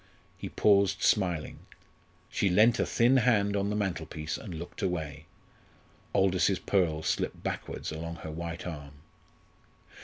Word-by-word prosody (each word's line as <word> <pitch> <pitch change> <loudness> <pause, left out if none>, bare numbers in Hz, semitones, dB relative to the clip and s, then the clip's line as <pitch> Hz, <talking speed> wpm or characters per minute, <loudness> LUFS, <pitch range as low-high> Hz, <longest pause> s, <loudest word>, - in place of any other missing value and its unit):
He - - -6
paused 100 -2 +3
smiling. 90 -7 +1 0.7
She 100 - +1
leant 110 +6 +5
a - - +1
thin 120 +3 +4
hand 105 -5 +3
on 100 0 0
the 105 - -1
mantelpiece 85 -6 -3
and 90 -7 -7
looked 85 +2 -8
away; 80 -4 -3 0.9
Aldous's 95 -1 +3
pearls 85 -5 0
slipped - - -1
backwards - - -4
along 80 +1 -5
her 80 -1 -7
white 85 +2 -5
arm. 75 -5 -7
90 Hz, 130 wpm, -29 LUFS, 80-100 Hz, 0.9 s, leant